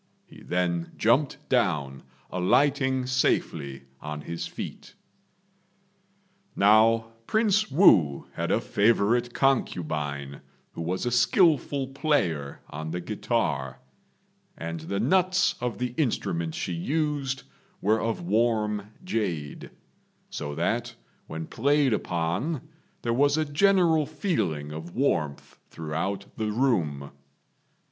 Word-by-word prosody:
He - - -15
then 85 -2 -1
jumped 140 +6 +1
down, 75 - 0 0.3
alighting 130 - +2
safely 75 - 0 0.2
on 75 0 -5
his 85 +3 -5
feet. - - -8 1.6
Now 110 +2 +4 0.2
Prince 215 -1 +2
Wu 90 - +5
had - - -3
a - - +3
favourite 115 +3 +2
concubine, 75 - -1 0.3
who - - -7
was 90 +7 -2
a 120 - 0
skilful 140 - +3
player 130 - -1
on 80 +2 -5
the 90 +2 -3
guitar; 100 - -2 0.8
and 85 0 -5
the 100 +5 -3
nuts 180 - +3
of 125 -2 -2
the 125 0 -3
instrument 85 - -1
she 90 - -3
used 140 - -1 0.4
were 110 +2 +2
of 115 -5 -2
warm 105 0 +1 0.2
jade, 90 - -3 0.6
so 75 -1 -4
that - - -1 0.3
when 80 0 -5
played 140 - +2
upon 105 - -2 0.4
there 115 - 0
was 145 +4 +3
a 155 - +1
general 165 -1 +3
feeling 90 - -2
of 80 +3 -8
warmth 80 - -1
throughout 85 +5 -3
the 110 -1 -1
room. 85 - 0
110 Hz, 110 wpm, -27 LUFS, 80-140 Hz, 1.6 s, Wu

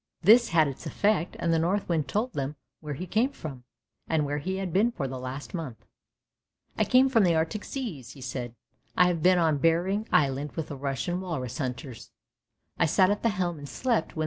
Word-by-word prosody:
" - - -56
This 235 +1 +6
had 160 -2 +4
its 135 - -6
effect, 205 -4 +1
and 170 -1 0
the 165 - +3
Northwind 170 -3 0
told 235 +5 -1
them 140 +1 -3 0.2
where 150 -2 -5
he 180 - -5
came 220 +8 +1
from, 140 - -9 0.4
and 155 -2 +1
where 145 +1 -2
he 185 +6 -3
had 190 -3 -4
been 220 +5 +3
for 140 - -3
the 130 0 -6
last 130 +3 -6
month. 155 - -6 0.4
" - - -48
I - - +4
come 255 +1 +5
from 235 -5 +4
the 175 -3 +3
Arctic 160 +6 -1
seas," 165 - -6
he 135 - -13
said. 120 -2 -5 0.2
" - - -35
I 180 - +7
have 175 -2 0
been 180 +2 +5
on 160 -4 +2
Behring 180 +7 +1
Island 140 0 +1
with 160 -2 -4
the 145 - -5
Russian 140 +6 -2
walrus 150 -7 -4
hunters. 125 -3 -5 0.7
I - - +4
sat 185 +4 +4
at 205 - -1
the 230 - +2
helm 180 -6 -2
and 145 -1 -9
slept 230 - -1
when. - - -5
165 Hz, 220 wpm, -27 LUFS, 140-190 Hz, 0.7 s, I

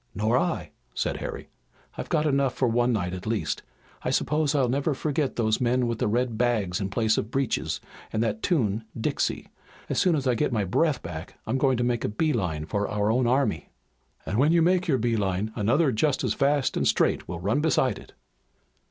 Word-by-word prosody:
"Nor 110 +3 +1
I," 90 -7 0 0.2
said - - -1
Harry. - - -6 0.4
"I've - - -6
got 150 - +1
enough 140 -3 +1
for 130 - +1
one 120 +2 +2
night 90 -6 -1
at 95 +3 -6
least. 95 -10 -1 0.4
I - - -2
suppose 150 -1 +1
I'll 135 -3 +3
never 140 +4 0
forget 150 0 -1
those 110 -1 +1
men 125 +1 +2
with 115 -1 -2
the - - +1
red 120 +1 0
bags 110 -7 +1
in 95 - -2
place 110 +2 +1
of 110 - -4
breeches, 135 0 -1 0.3
and 110 +1 0
that 110 -1 -2
tune, 115 - +1 0.2
'Dixie.' 110 - -1 0.4
As - - 0
soon 180 -3 +3
as 140 -3 -2
I 125 - +3
get 115 - 0
my 110 -4 +1
breath 150 - +1
back 85 0 -7
I'm 130 - -1
going 130 -2 +3
to 120 - 0
make 120 -1 0
a - - 0
bee 150 +9 0
line 80 -5 -2
for 100 +4 -1
our 105 +1 +1
own 125 +1 +2
army." 125 - +1 0.6
"And 105 - -1
when 145 +4 +4
you 170 -1 +4
make 180 +1 +2
your 140 -5 +3
bee 115 -1 0
line 100 +1 -1
another 130 +7 +2
just 135 +5 +1
as - - +1
fast 140 0 +1
and - - +1
straight - - +1
will 85 - -5
run 100 +10 +1
beside 130 -7 +1
it." - - -15
120 Hz, 215 wpm, -26 LUFS, 105-140 Hz, 0.6 s, when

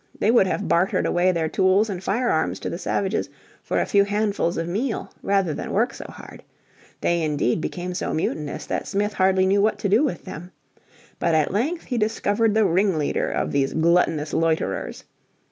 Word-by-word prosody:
They 215 - +2
would 230 -5 +4
have 200 +2 -2
bartered 175 +3 +2
away 180 +1 +2
their 165 -3 -1
tools 190 +5 +3
and 190 -3 -5
firearms 200 -6 0
to - - -3
the 170 - -5
savages 195 -1 -1 0.3
for - - -1
a - - +1
few 200 -1 +4
handfuls 205 -4 -1
of 165 0 -2
meal 220 +8 -2
rather 195 -5 +1
than - - -5
work 230 +6 +1
so - - -9
hard. - - -12 0.6
They 170 -1 +1
indeed 150 -2 0
became 180 +2 -4
so 180 - -3
mutinous 155 -2 -3
that - - -3
Smith 205 +1 -1
hardly 190 0 +3
knew 200 +1 +3
what 215 +1 +2
to 200 - -2
do 215 +8 +4
with 220 - -2
them. 175 +4 -8 0.7
But 170 -1 +1
at 155 +2 +1
length 300 - -1
he 245 -3 -2
discovered 215 0 +1
the 220 -1 +4
ringleader 185 -4 +1
of - - -2
these 135 -1 0
"gluttonous 160 -2 +2
loiterers." 165 -1 -1
190 Hz, 185 wpm, -23 LUFS, 165-205 Hz, 0.7 s, would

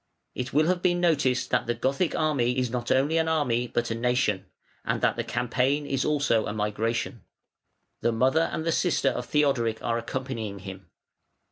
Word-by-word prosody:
It 125 +1 -4
will 155 +2 +3
have 180 +1 +1
been 175 -1 +2
noticed 145 -8 +1
that - - +1
the 120 - 0
Gothic 140 +8 0
army 135 -6 +1
is 125 -2 0
not 120 -1 -3
only 145 +5 +3
an 160 - +1
army 125 -7 +1
but 120 0 -2
a - - +1
nation, 115 -4 0 0.4
and - - -1
that - - +2
the - - -2
campaign 125 +4 0
is 135 -2 -1
also 140 -7 +1
a - - -3
migration. 110 +2 -2 0.8
The 120 - +1
mother 130 +8 +2
and 160 - -3
the 165 - +1
sister 165 -4 +2
of 125 -1 -4
Theodoric 135 -7 +1
are 115 0 0
accompanying 115 -4 -4
him. 95 -1 -9
125 Hz, 180 wpm, -26 LUFS, 115-150 Hz, 0.8 s, will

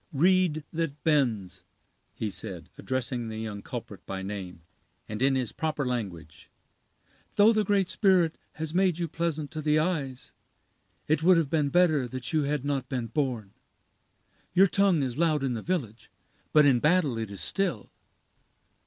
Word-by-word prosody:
"Reed 170 0 +3
that 160 -3 -3
bends," 120 - +1 0.5
he 110 -2 -3
said, 90 -6 -4
addressing 125 -2 -3
the 110 -1 -6
young 105 -2 -5
culprit - - -7
by 95 0 -4
name, 95 -4 -6 0.4
and 105 +2 -5
in 135 0 +3
his 125 -4 0
proper 155 -3 -2
language, 95 - -5 0.9
"though 215 +3 +6
the 215 -1 +2
Great 200 -2 +2
Spirit 180 -6 +3 0.2
has 155 0 -5
made 185 -2 +2
you 170 -1 -2
pleasant 160 -2 -3
to 155 - -4
the 150 0 +2
eyes, 150 -6 -2 0.8
it 155 +1 +2
would 180 +2 +6
have 160 -4 0
been 150 -3 +2
better 155 -6 +3
that 130 +5 -6
you 155 -2 +2
had 145 -1 -1
not 135 -3 -2
been 125 -4 -3
born. 120 -7 -2 1.0
Your 190 +2 +7
tongue 195 -5 +3
is 125 +1 -3
loud 155 -4 +2
in 130 -2 0
the 115 - -4
village, 125 - -3 0.4
but 150 -1 +6
in 130 -4 +5
battle 150 -5 +2
it 110 -2 -4
is 100 -2 -6
still. 180 - -1
145 Hz, 160 wpm, -28 LUFS, 115-165 Hz, 1.0 s, Your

